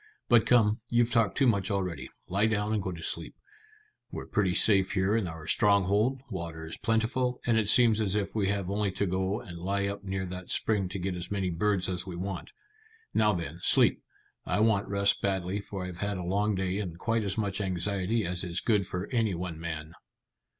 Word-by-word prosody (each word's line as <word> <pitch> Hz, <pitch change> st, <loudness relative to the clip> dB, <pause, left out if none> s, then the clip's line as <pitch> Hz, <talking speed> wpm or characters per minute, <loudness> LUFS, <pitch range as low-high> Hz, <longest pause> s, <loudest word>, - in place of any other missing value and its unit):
But 120 Hz, -2 st, +5 dB
come, 110 Hz, -3 st, +4 dB
you've 120 Hz, 0 st, +2 dB
talked 115 Hz, -5 st, +2 dB
too 140 Hz, -, +4 dB
much 100 Hz, -6 st, +2 dB
already. 90 Hz, -9 st, -2 dB, 0.2 s
Lie 100 Hz, +4 st, +2 dB
down 105 Hz, 0 st, 0 dB
and 105 Hz, -, 0 dB
go 95 Hz, -, -3 dB
to 85 Hz, -2 st, -8 dB
sleep. 85 Hz, -, -3 dB, 0.8 s
We're -, -, -6 dB
pretty 95 Hz, -5 st, 0 dB
safe 95 Hz, -3 st, +4 dB
here 95 Hz, +2 st, +2 dB
in 110 Hz, -5 st, 0 dB
our 80 Hz, -2 st, -8 dB
stronghold; 105 Hz, -, +2 dB
water 85 Hz, -4 st, -5 dB
is 80 Hz, -, -5 dB
plentiful; 120 Hz, +3 st, 0 dB
and 120 Hz, -, +2 dB
it 110 Hz, -2 st, +2 dB
seems 115 Hz, -2 st, +5 dB
as 100 Hz, -2 st, 0 dB
if 100 Hz, -2 st, -1 dB
we 105 Hz, -3 st, 0 dB
have 100 Hz, -2 st, -1 dB
only 100 Hz, 0 st, 0 dB
to 100 Hz, +2 st, 0 dB
go 95 Hz, +2 st, -1 dB
and 85 Hz, -3 st, -9 dB
lie 100 Hz, +3 st, -1 dB
up 100 Hz, 0 st, -4 dB
near 95 Hz, -1 st, -3 dB
that 90 Hz, 0 st, -7 dB
spring 100 Hz, -4 st, +1 dB
to 95 Hz, -, -5 dB
get 95 Hz, 0 st, -3 dB
as 90 Hz, 0 st, -5 dB
many 95 Hz, -3 st, -1 dB
birds 95 Hz, +2 st, +1 dB
as 90 Hz, -1 st, -3 dB
we 90 Hz, -, -5 dB
want. 95 Hz, +2 st, -5 dB, 0.6 s
Now 105 Hz, -1 st, +3 dB
then, 85 Hz, -2 st, -5 dB
sleep. -, -, +4 dB, 0.4 s
I -, -, -1 dB
want 110 Hz, -3 st, +2 dB
rest 100 Hz, 0 st, +1 dB
badly, 95 Hz, 0 st, -1 dB
for 100 Hz, -2 st, -6 dB
I've 90 Hz, -1 st, -7 dB
had 100 Hz, -1 st, -2 dB
a 90 Hz, -, -4 dB
long 100 Hz, +4 st, 0 dB
day 95 Hz, +1 st, -1 dB
and 90 Hz, -5 st, -5 dB
quite 115 Hz, +4 st, 0 dB
as 100 Hz, 0 st, -2 dB
much 100 Hz, -2 st, -1 dB
anxiety 95 Hz, +3 st, -1 dB
as 90 Hz, 0 st, -1 dB
is 85 Hz, -1 st, -1 dB
good 105 Hz, -5 st, +1 dB
for 90 Hz, +1 st, -3 dB
any 115 Hz, -6 st, +1 dB
one 85 Hz, -2 st, -5 dB
man." 80 Hz, -1 st, -5 dB
100 Hz, 210 wpm, -29 LUFS, 90-105 Hz, 0.8 s, But